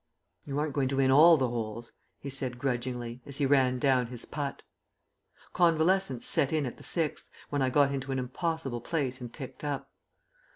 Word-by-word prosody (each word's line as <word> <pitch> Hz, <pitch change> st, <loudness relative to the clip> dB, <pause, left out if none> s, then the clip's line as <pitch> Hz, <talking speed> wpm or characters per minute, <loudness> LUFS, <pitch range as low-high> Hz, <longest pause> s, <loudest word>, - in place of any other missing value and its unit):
"You 140 Hz, -1 st, -4 dB
aren't 150 Hz, -1 st, -1 dB
going 135 Hz, -2 st, +1 dB
to 135 Hz, +1 st, -2 dB
win 135 Hz, -1 st, +4 dB
all 160 Hz, +4 st, +8 dB
the 130 Hz, -3 st, +1 dB
holes," 115 Hz, -1 st, -5 dB, 0.3 s
he 140 Hz, -, -6 dB
said 130 Hz, -2 st, -3 dB
grudgingly, 125 Hz, -2 st, -3 dB
as 140 Hz, -1 st, -5 dB
he 145 Hz, -, +1 dB
ran 130 Hz, -2 st, +3 dB
down 130 Hz, -2 st, +2 dB
his 120 Hz, -1 st, -8 dB
putt. 145 Hz, -2 st, -5 dB, 0.9 s
Convalescence 170 Hz, -5 st, +2 dB
set 145 Hz, -4 st, +3 dB
in 155 Hz, -3 st, +1 dB
at 125 Hz, -, -6 dB
the -, -, -14 dB
sixth, 165 Hz, -4 st, -2 dB, 0.2 s
when 145 Hz, -1 st, 0 dB
I 130 Hz, -, +2 dB
got 140 Hz, +1 st, +3 dB
into 135 Hz, 0 st, -4 dB
an 135 Hz, -, -1 dB
impossible 135 Hz, -1 st, -3 dB
place 130 Hz, -4 st, -2 dB
and 120 Hz, -1 st, -7 dB
picked 135 Hz, +1 st, -9 dB
up. 145 Hz, -2 st, -4 dB
135 Hz, 190 wpm, -29 LUFS, 125-145 Hz, 0.9 s, all